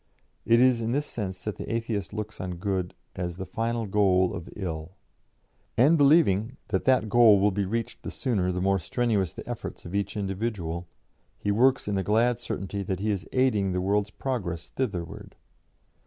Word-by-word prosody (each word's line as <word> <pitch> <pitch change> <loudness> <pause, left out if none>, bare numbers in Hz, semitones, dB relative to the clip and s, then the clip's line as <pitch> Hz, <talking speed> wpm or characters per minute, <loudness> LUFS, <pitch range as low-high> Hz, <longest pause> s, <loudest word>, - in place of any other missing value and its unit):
It 115 +1 +6
is 125 -2 +4
in 115 +1 -1
this 145 +2 0
sense 95 -7 -5
that 105 - -4
the - - -5
Atheist 115 -3 -2
looks 105 +1 -5
on 90 -1 -4
good 90 0 -2 0.2
as 85 -1 -3
'the 95 +1 -5
final 115 +1 -2
goal 95 -2 +3
of 85 -3 -6
ill,' 85 -2 -5 0.8
and 140 +8 +6
believing 135 - +4
that 95 -3 0
that 130 -4 +3
goal 110 -2 +6
will 105 +1 +3
be 100 +1 -1
reached 115 +4 -3
the - - -5
sooner 100 -8 0
the 90 0 -2
more 95 0 +3
strenuous 100 -1 0
the - - -10
efforts - - -6
of 85 - -8
each 100 +1 -1
individual, 95 -4 -3 0.5
he 100 - -1
works 125 +4 +3
in 105 - -1
the 95 -1 0
glad 115 +5 +2
certainty 100 -4 -4
that 95 -1 -3
he 105 +2 0
is 100 -3 -4
aiding 105 -8 +2
the 90 - 0
world's 100 +2 +1
progress 100 -10 -4
thitherward. 95 -11 -4
100 Hz, 185 wpm, -27 LUFS, 95-115 Hz, 0.8 s, It